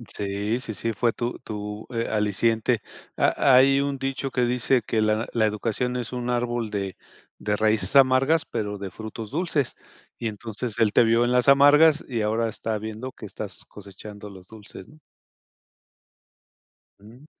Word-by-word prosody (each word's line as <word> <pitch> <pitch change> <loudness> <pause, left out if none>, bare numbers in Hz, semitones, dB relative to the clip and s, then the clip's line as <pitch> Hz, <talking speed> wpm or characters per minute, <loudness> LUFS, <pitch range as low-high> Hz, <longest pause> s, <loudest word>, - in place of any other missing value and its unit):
Sí, 105 +4 -2
sí, 115 -4 -5
sí 115 +4 -2
fue 115 +2 +1
tu 120 +1 -3
tu, 105 0 -6
eh, 115 0 -1
aliciente. 110 +2 +1 0.3
Ha 135 - +3
hay 135 +1 +6
un 140 -1 -2
dicho 135 0 -3
que 125 - 0
dice 125 +1 +2
que 110 +1 -1
la 110 +1 +1
la 115 -2 +2
educación 115 +4 -1
es 120 -1 -4
un 125 0 -2
árbol 120 -2 -1
de 100 -2 -4 0.4
de 105 0 -1
raíces 110 +5 +1
amargas, 135 +4 +5
pero 105 -1 -4
de 100 - -5
frutos 110 +1 -8
dulces, 155 -4 -1 0.4
y 115 - -3
entonces 110 +2 -6
él 105 -2 +3
te - - +6
vio 115 +1 +3
en 120 - 0
las 125 +1 +2
amargas 145 +3 +6
y 120 -3 -2
ahora 110 +2 0
está 110 0 -3
viendo 110 +4 -6
que 110 - -11
estás 105 0 -8
cosechando 105 +1 -11
los 95 -1 -13
dulces, 105 -3 -11
¿no? 155 - -18 2.0
Mm. 115 +7 -16
115 Hz, 165 wpm, -24 LUFS, 105-125 Hz, 2.0 s, hay